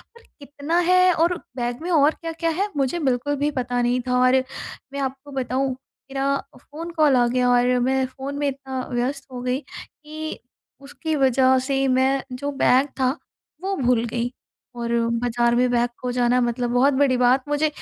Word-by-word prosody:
पर 470 Hz, -, -16 dB, 0.2 s
कितना 290 Hz, +3 st, -3 dB
है 365 Hz, 0 st, +6 dB
और 340 Hz, +2 st, +2 dB, 0.2 s
बैग 240 Hz, +1 st, -3 dB
में 350 Hz, -, -4 dB
और 300 Hz, -2 st, +5 dB
क्या-क्या 330 Hz, 0 st, -2 dB
है 400 Hz, -, +1 dB
मुझे 275 Hz, +5 st, 0 dB
बिल्कुल 280 Hz, 0 st, 0 dB
भी 290 Hz, +2 st, +1 dB
पता 245 Hz, -3 st, -1 dB
नहीं 245 Hz, +1 st, +1 dB
था। 250 Hz, 0 st, +2 dB
और 255 Hz, +1 st, +4 dB, 0.6 s
मैं 280 Hz, -, -4 dB
आपको 270 Hz, +1 st, -5 dB
बताऊँ 265 Hz, 0 st, -1 dB, 0.4 s
मेरा 275 Hz, +1 st, 0 dB, 0.2 s
फ़ोन 330 Hz, +3 st, -8 dB
कॉल 300 Hz, -4 st, +5 dB
आ 240 Hz, -1 st, +4 dB
गया 250 Hz, +1 st, +1 dB
और 245 Hz, 0 st, +3 dB
मैं 265 Hz, +1 st, +1 dB
फ़ोन 270 Hz, +2 st, -7 dB
में 290 Hz, -, 0 dB
इतना 265 Hz, -1 st, -4 dB
व्यस्त 260 Hz, +3 st, -2 dB
हो 250 Hz, -1 st, -6 dB
गई 250 Hz, +1 st, -1 dB
कि 310 Hz, +1 st, -9 dB, 0.4 s
उसकी 310 Hz, +3 st, -4 dB
वज़ह 260 Hz, -1 st, +4 dB
से 270 Hz, -1 st, +1 dB
मैं 265 Hz, +1 st, +2 dB
जो 280 Hz, +3 st, -4 dB
बैग 265 Hz, +1 st, +4 dB
था 255 Hz, -, +3 dB, 0.5 s
वो 390 Hz, 0 st, -1 dB
भूल 245 Hz, -3 st, +2 dB
गई। 235 Hz, +1 st, -2 dB, 0.4 s
और 235 Hz, -1 st, -3 dB, 0.3 s
बाज़ार 240 Hz, 0 st, +1 dB
में 250 Hz, 0 st, +3 dB
बैग 240 Hz, 0 st, +2 dB
खो 250 Hz, -, -2 dB
जाना 245 Hz, 0 st, +2 dB
मतलब 240 Hz, 0 st, -1 dB
बहुत 260 Hz, +4 st, +3 dB
बड़ी 265 Hz, -1 st, +3 dB
बात 250 Hz, +2 st, +3 dB
मुझे 295 Hz, +1 st, +2 dB
265 Hz, 180 wpm, -23 LUFS, 245-285 Hz, 0.6 s, है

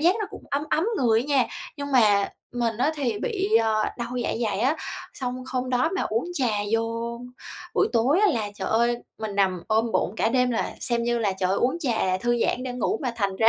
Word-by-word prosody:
giác 350 Hz, +6 st, +4 dB
nó 415 Hz, -, -1 dB
cũng -, -, -10 dB
ấm 280 Hz, +1 st, 0 dB
ấm 320 Hz, -, +2 dB
người 230 Hz, -5 st, +3 dB
á -, -, -3 dB
nha. 275 Hz, -4 st, +3 dB, 0.3 s
Nhưng 285 Hz, -1 st, -5 dB
mà 205 Hz, -5 st, +5 dB, 0.3 s
mình 230 Hz, -3 st, 0 dB
á 295 Hz, +5 st, +2 dB
thì 245 Hz, -8 st, -1 dB
bị, 405 Hz, -3 st, -1 dB
ờ, 220 Hz, -1 st, +2 dB
đau 240 Hz, +1 st, -4 dB
dạ -, -, -1 dB
dày 210 Hz, -1 st, -1 dB
á, 275 Hz, +6 st, +2 dB, 0.4 s
xong 255 Hz, -1 st, -4 dB
hôm 255 Hz, 0 st, -2 dB
đó 250 Hz, +5 st, +2 dB
mà -, -, 0 dB
uống 225 Hz, +6 st, -1 dB
trà 260 Hz, -6 st, +1 dB, 0.2 s
vô 230 Hz, +1 st, -1 dB, 0.6 s
buổi -, -, +3 dB
tối 260 Hz, -, +3 dB
á 425 Hz, -, +5 dB
là, 215 Hz, -4 st, -2 dB
trời 190 Hz, -, -4 dB
ơi, 235 Hz, +2 st, +2 dB, 0.2 s
mình 215 Hz, -2 st, -4 dB
nằm 185 Hz, -3 st, +1 dB
ôm 225 Hz, +1 st, +2 dB
bụng 190 Hz, -, 0 dB
cả 225 Hz, -, +2 dB
đêm, 250 Hz, 0 st, +2 dB
là 230 Hz, -, -1 dB
xem 235 Hz, -2 st, 0 dB
như 240 Hz, 0 st, +1 dB
là, 205 Hz, -4 st, +1 dB
trời 185 Hz, -1 st, +1 dB
ơi, 195 Hz, -, +1 dB
uống 260 Hz, +7 st, +1 dB
trà 220 Hz, -, +1 dB
thư 240 Hz, +1 st, +1 dB
giãn 255 Hz, -, +1 dB
để 255 Hz, -, -4 dB
ngủ 320 Hz, -, -1 dB
mà 250 Hz, -2 st, -1 dB
thành 200 Hz, -3 st, -1 dB
ra 225 Hz, +2 st, +5 dB
235 Hz, 235 wpm, -25 LUFS, 220-260 Hz, 0.6 s, mà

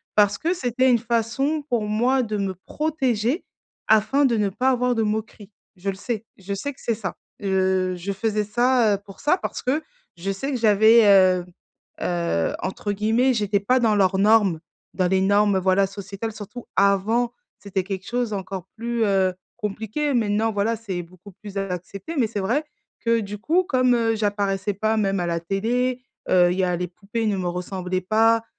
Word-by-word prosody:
parce 205 Hz, -1 st, +4 dB
que 340 Hz, +3 st, 0 dB
c'était 260 Hz, -4 st, +1 dB
une 240 Hz, -, +5 dB
façon 235 Hz, +6 st, 0 dB
pour 235 Hz, -3 st, +1 dB
moi 245 Hz, +5 st, +2 dB
de 215 Hz, -2 st, -3 dB
me 195 Hz, -1 st, -2 dB
protéger 275 Hz, -, -1 dB, 0.4 s
afin 220 Hz, +7 st, +4 dB
de 235 Hz, -4 st, +2 dB
ne 210 Hz, -, +2 dB
pas 250 Hz, +7 st, +1 dB
avoir 250 Hz, -1 st, +1 dB
de 225 Hz, -, +1 dB
moqueries. 215 Hz, -1 st, -4 dB, 0.3 s
Je 190 Hz, +2 st, -3 dB
le 195 Hz, -, -2 dB
sais, 225 Hz, +2 st, -4 dB
je 195 Hz, +1 st, -5 dB
sais 285 Hz, +9 st, -3 dB
que -, -, -23 dB
c'est 230 Hz, -, 0 dB
ça, 210 Hz, -3 st, -5 dB, 0.3 s
heu, 190 Hz, -1 st, +1 dB
je 190 Hz, +3 st, -4 dB
faisais 210 Hz, +1 st, -1 dB
ça, 240 Hz, 0 st, +3 dB
heu, -, -, -7 dB
pour 195 Hz, -, -13 dB
ça, 330 Hz, +5 st, +3 dB
parce -, -, -5 dB
que 290 Hz, +5 st, 0 dB, 0.3 s
je 195 Hz, +3 st, -3 dB
sais 270 Hz, +9 st, -3 dB
que 260 Hz, -, -1 dB
j'avais, 220 Hz, +1 st, +6 dB
heu 185 Hz, -3 st, +5 dB, 0.6 s
heu, 170 Hz, -, 0 dB
entre 205 Hz, +2 st, -3 dB
guillemets 225 Hz, +6 st, +2 dB
«j'étais 205 Hz, -3 st, +1 dB
pas 250 Hz, +6 st, +2 dB
dans 220 Hz, -2 st, +3 dB
leurs 190 Hz, -1 st, +3 dB
normes», 205 Hz, -5 st, +4 dB, 0.4 s
dans 185 Hz, -2 st, +2 dB
les 190 Hz, +1 st, +2 dB
normes, 200 Hz, 0 st, +3 dB
voilà, 190 Hz, +1 st, +3 dB
sociétales, 200 Hz, +3 st, -6 dB
surtout 215 Hz, +3 st, -9 dB
avant. 205 Hz, +5 st, +2 dB, 0.3 s
C'était 195 Hz, -2 st, -2 dB
quelque 190 Hz, 0 st, -6 dB
chose 240 Hz, -2 st, -1 dB
encore 190 Hz, -2 st, -5 dB
plus, 235 Hz, 0 st, -1 dB
heu, 190 Hz, -2 st, +2 dB, 0.2 s
compliqué. 220 Hz, +7 st, -2 dB
Maintenant, 220 Hz, -1 st, +1 dB
voilà, 205 Hz, +3 st, +1 dB
c'est 195 Hz, -5 st, -4 dB
beaucoup 185 Hz, +3 st, -15 dB
plus 205 Hz, -1 st, -8 dB
accepté 195 Hz, -, -5 dB
mais 250 Hz, -, +3 dB
c'est 210 Hz, -1 st, -4 dB
vrai 240 Hz, +11 st, 0 dB, 0.4 s
que 230 Hz, 0 st, +2 dB
du 205 Hz, 0 st, -6 dB
coup, 330 Hz, -, +2 dB
comme, 255 Hz, -3 st, +3 dB
heu, 225 Hz, -1 st, +1 dB
j'apparaissais 205 Hz, -1 st, -1 dB
pas 220 Hz, +3 st, 0 dB
même 195 Hz, -2 st, +1 dB
à 175 Hz, -, -1 dB
la 170 Hz, 0 st, -1 dB
télé, 245 Hz, +8 st, -1 dB, 0.3 s
heu, 180 Hz, -1 st, +5 dB
il -, -, -5 dB
y -, -, +3 dB
a 180 Hz, -, 0 dB
les 180 Hz, +1 st, -2 dB
poupées 205 Hz, +6 st, -4 dB
ne 205 Hz, -, +1 dB
me 180 Hz, -, -2 dB
ressemblaient 180 Hz, +1 st, -3 dB
pas, 225 Hz, +4 st, +3 dB
210 Hz, 190 wpm, -23 LUFS, 195-235 Hz, 0.6 s, j'avais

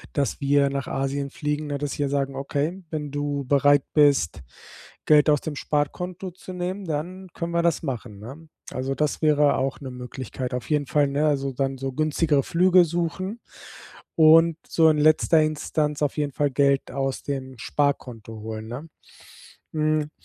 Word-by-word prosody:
dass 140 Hz, -2 st, -1 dB
wir 140 Hz, 0 st, +3 dB
nach 140 Hz, -1 st, -3 dB
Asien 135 Hz, +1 st, -2 dB
fliegen, 150 Hz, +1 st, -3 dB
na, 145 Hz, -1 st, -3 dB
dass 145 Hz, 0 st, -4 dB
wir 145 Hz, -1 st, 0 dB
sagen: 135 Hz, -1 st, -1 dB
„Okay, 145 Hz, +7 st, -2 dB
wenn 150 Hz, -3 st, -4 dB
du 145 Hz, -1 st, -2 dB
bereit 145 Hz, +1 st, +4 dB
bist 140 Hz, -, +3 dB, 0.6 s
Geld 150 Hz, 0 st, +5 dB
aus 150 Hz, -2 st, +4 dB
dem 155 Hz, -2 st, -5 dB
Sparkonto 175 Hz, +7 st, -2 dB
zu 185 Hz, +1 st, -10 dB
nehmen, 185 Hz, +2 st, -4 dB
dann 180 Hz, +5 st, -4 dB
können 170 Hz, 0 st, -4 dB
wir 170 Hz, 0 st, +1 dB
das 170 Hz, -2 st, +1 dB
machen, 120 Hz, -7 st, -5 dB
ne?" 145 Hz, +8 st, -10 dB, 0.2 s
Also, 130 Hz, +1 st, -3 dB
das 150 Hz, +2 st, -1 dB
wäre 150 Hz, -2 st, +4 dB
auch 135 Hz, +1 st, -2 dB
'ne 135 Hz, -2 st, -7 dB
Möglichkeit, 125 Hz, 0 st, -6 dB
auf 125 Hz, +4 st, -5 dB
jeden 145 Hz, -2 st, +1 dB
Fall, 145 Hz, 0 st, +2 dB
ne, 145 Hz, +2 st, +1 dB
also 140 Hz, -2 st, 0 dB
dann 135 Hz, +1 st, -2 dB
so 135 Hz, +1 st, -3 dB
günstigere 155 Hz, 0 st, +1 dB
Flüge 180 Hz, +1 st, +4 dB
suchen 175 Hz, +6 st, -3 dB, 0.8 s
und 165 Hz, 0 st, +6 dB
so 160 Hz, -1 st, +4 dB
in 150 Hz, -, +1 dB
letzter 155 Hz, +1 st, +4 dB
Instanz 155 Hz, -1 st, -1 dB
auf 145 Hz, -, 0 dB
jeden 145 Hz, -2 st, -1 dB
Fall 145 Hz, +1 st, 0 dB
Geld 140 Hz, 0 st, +2 dB
aus 135 Hz, 0 st, -2 dB
dem 130 Hz, -3 st, -5 dB
Sparkonto 125 Hz, -5 st, -2 dB
holen, 110 Hz, 0 st, -6 dB
ne? 130 Hz, +8 st, -7 dB, 0.9 s
Hm, 155 Hz, -1 st, 0 dB
145 Hz, 170 wpm, -24 LUFS, 135-155 Hz, 0.9 s, und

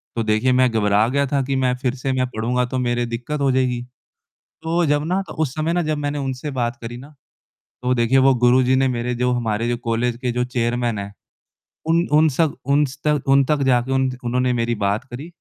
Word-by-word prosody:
तो 115 Hz, -, 0 dB
देखिए 110 Hz, +4 st, +1 dB
मैं 130 Hz, 0 st, +4 dB
घबरा 105 Hz, 0 st, +2 dB
गया 140 Hz, +2 st, +1 dB
था 140 Hz, 0 st, 0 dB
कि 135 Hz, -, +1 dB
मैं 125 Hz, -1 st, +2 dB
फिर 130 Hz, -1 st, -1 dB
से 135 Hz, +1 st, -3 dB
मैं 130 Hz, 0 st, 0 dB
पढ़ूँगा 125 Hz, +3 st, 0 dB
तो 125 Hz, +1 st, -4 dB
मेरे 120 Hz, -1 st, 0 dB
दिक्कत 120 Hz, +6 st, -4 dB
हो 135 Hz, -1 st, +3 dB
जाएगी, 125 Hz, -2 st, 0 dB, 0.8 s
तो 165 Hz, +1 st, +1 dB
जब 145 Hz, -1 st, +1 dB
ना 185 Hz, +3 st, 0 dB
तो -, -, -8 dB
उस 130 Hz, -5 st, -3 dB
समय 155 Hz, +2 st, -1 dB
ना 175 Hz, -, +1 dB
जब 155 Hz, -1 st, -1 dB
मैंने 145 Hz, 0 st, -3 dB
उनसे 135 Hz, +1 st, -4 dB
बात 120 Hz, -2 st, -2 dB
करी 120 Hz, +1 st, -7 dB
ना, 140 Hz, +5 st, -13 dB, 0.7 s
तो 125 Hz, 0 st, +1 dB
देखिए 120 Hz, +2 st, +2 dB
वो 135 Hz, 0 st, +5 dB
गुरुजी 125 Hz, +1 st, +3 dB
ने 135 Hz, 0 st, +2 dB
मेरे 125 Hz, -1 st, -2 dB
जो 125 Hz, +1 st, 0 dB
हमारे 115 Hz, -1 st, -1 dB
जो 120 Hz, -, -1 dB
कॉलेज 115 Hz, +1 st, 0 dB
के 125 Hz, -, -1 dB
जो 125 Hz, +1 st, 0 dB
चेयरमैन 120 Hz, -2 st, -1 dB
हैं 100 Hz, 0 st, -7 dB, 0.7 s
उन 170 Hz, +2 st, +2 dB
उन 155 Hz, +1 st, +5 dB
सक 150 Hz, +2 st, +1 dB
उन 140 Hz, +2 st, +3 dB
स 135 Hz, +1 st, -8 dB
तक 150 Hz, -2 st, +1 dB
उन 135 Hz, 0 st, +5 dB
तक 150 Hz, +1 st, 0 dB
जाके 125 Hz, -1 st, +2 dB
उन 130 Hz, 0 st, +2 dB
उन्होंने 125 Hz, +1 st, 0 dB
मेरी 120 Hz, 0 st, 0 dB
बात 100 Hz, +4 st, 0 dB
करी 130 Hz, +3 st, -9 dB
125 Hz, 225 wpm, -21 LUFS, 120-140 Hz, 0.8 s, वो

